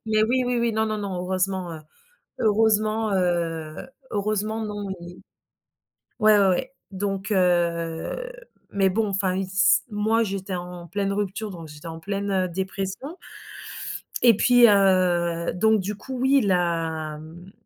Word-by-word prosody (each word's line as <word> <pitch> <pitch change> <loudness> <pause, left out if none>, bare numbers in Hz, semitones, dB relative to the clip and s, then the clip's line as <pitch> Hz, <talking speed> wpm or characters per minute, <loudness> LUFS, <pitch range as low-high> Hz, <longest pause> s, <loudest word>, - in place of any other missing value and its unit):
Mais 215 0 +2
oui, 255 +3 +1
oui, 245 -1 0
oui, 235 -1 +1
non, 220 0 +1
non, 215 -1 -2
non 200 -2 -4
heureusement, 185 -1 -1
heu, 160 - -8 0.6
heureusement, 215 0 +2
heu, 165 -4 -1 0.3
heureusement 215 +2 -1
non 205 -1 -5
i 175 +1 -11 1.0
ouais, 215 -1 +5
ouais, 195 -1 +4
ouais. 255 +9 0 0.2
Donc 195 +1 -3
heu, 175 - 0 0.4
mais 195 -1 +2
bon 215 +3 0
enfin, 190 -1 0
il 195 - -1
s 190 0 +3
moi 220 +2 +1
j'étais 195 -1 -4
en 175 0 -7
pleine 200 +2 -1
rupture, 205 +1 -3
donc 165 -4 -9
j'étais 150 +2 -12
en 160 0 -7
pleine, 200 +2 -3
heu, 185 -2 +1
dépression 195 - -4 1.1
et 235 -4 +7
puis, 245 +1 +6
heu, 180 -4 +3
donc 220 +4 +3
du 200 +2 -3
coup 260 +5 -7
oui 265 +2 +4
il - - -1
l'a 165 -4 0
hem 170 +5 -12
195 Hz, 155 wpm, -24 LUFS, 175-215 Hz, 1.1 s, et